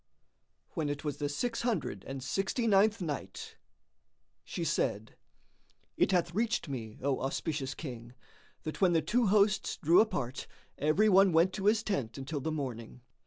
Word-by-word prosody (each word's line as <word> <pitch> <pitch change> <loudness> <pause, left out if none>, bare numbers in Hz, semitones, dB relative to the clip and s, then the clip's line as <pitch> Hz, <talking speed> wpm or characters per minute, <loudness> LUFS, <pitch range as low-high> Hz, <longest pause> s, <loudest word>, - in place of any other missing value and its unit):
When 155 -4 -2
it 145 0 -4
was 150 -3 -3
the 145 -1 -2
Six 230 +11 -2
Hundred 230 - -2
and 135 -1 -5
Sixty 195 - -1
ninth 210 0 +3
Night, 145 - -5 0.9
She - - -5
said, 105 +2 -1 0.8
It - - +2
hath 175 -2 +1
reached 225 -2 0
me, 115 -6 -6
O 140 -1 +1
auspicious 135 +1 -2
King, 120 -5 -8 0.5
that 155 - -6
when 180 -2 +5
the 165 -2 +2
two 235 +7 +2
hosts 205 0 +2
drew 170 +3 +5
apart, 140 - -2 0.3
every 155 +9 +3
one 195 -2 +5
went 170 +3 +4
to 195 -1 -4
his 220 +1 +3
tent 140 - -2
until 140 +2 -4
the 160 - -2
morning. 125 -5 -5
160 Hz, 160 wpm, -31 LUFS, 135-195 Hz, 0.9 s, when